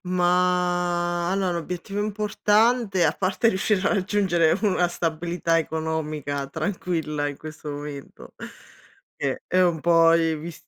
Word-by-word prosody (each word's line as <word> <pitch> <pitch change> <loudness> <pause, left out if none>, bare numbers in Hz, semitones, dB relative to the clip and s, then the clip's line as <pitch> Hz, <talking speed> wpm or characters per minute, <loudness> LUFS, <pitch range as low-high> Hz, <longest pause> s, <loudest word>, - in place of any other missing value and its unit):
Ma 175 -1 +1
allo 190 -1 0
l'obiettivo 175 +4 -4
importante, 210 -1 +1
a 155 - +3
parte 195 +4 +1
riuscire 190 0 +1
a - - +1
raggiungere 185 -4 +2
una 185 -3 +2
stabilità 170 0 -1
economica 155 -3 -3
tranquilla, 160 -2 -2
in 145 -1 -6
questo 155 -1 -9
momento 145 -1 -8 0.8
ceh 135 -2 -3
è 185 - +1
un 175 -3 +2
po' 165 0 +5 0.3
visti 165 0 -9
175 Hz, 120 wpm, -24 LUFS, 160-185 Hz, 0.8 s, po